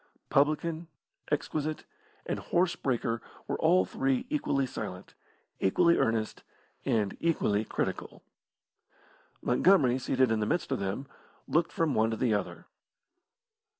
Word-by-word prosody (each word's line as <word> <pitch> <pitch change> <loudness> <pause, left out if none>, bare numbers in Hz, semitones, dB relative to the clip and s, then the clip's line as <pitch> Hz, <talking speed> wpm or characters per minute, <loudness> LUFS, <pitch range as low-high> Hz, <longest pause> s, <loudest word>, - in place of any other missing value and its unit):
Publican, 155 +3 +1 0.4
exquisite, 155 +1 -1 0.4
and - - -2
horse 175 0 +1
breaker 115 -3 -1 0.3
were - - -2
all 95 0 +4
three 135 +5 0
equally 140 -2 +1
silent, 90 -7 -7 0.5
equally 170 - +4
earnest, 110 -1 0 0.4
and 105 -4 +1
equally 110 -11 +1
critical. - - -4 1.2
Montgomery 130 -2 +4
seated 130 -1 +2
in 110 - +1
the 105 - 0
midst 175 - -1
of 135 - 0
them, 100 +8 -3 0.4
looked 165 +1 +1
from 160 -4 0
one 110 -1 +3
to 110 - -2
the 115 -1 +2
other. 105 - -3
130 Hz, 120 wpm, -29 LUFS, 110-155 Hz, 1.2 s, all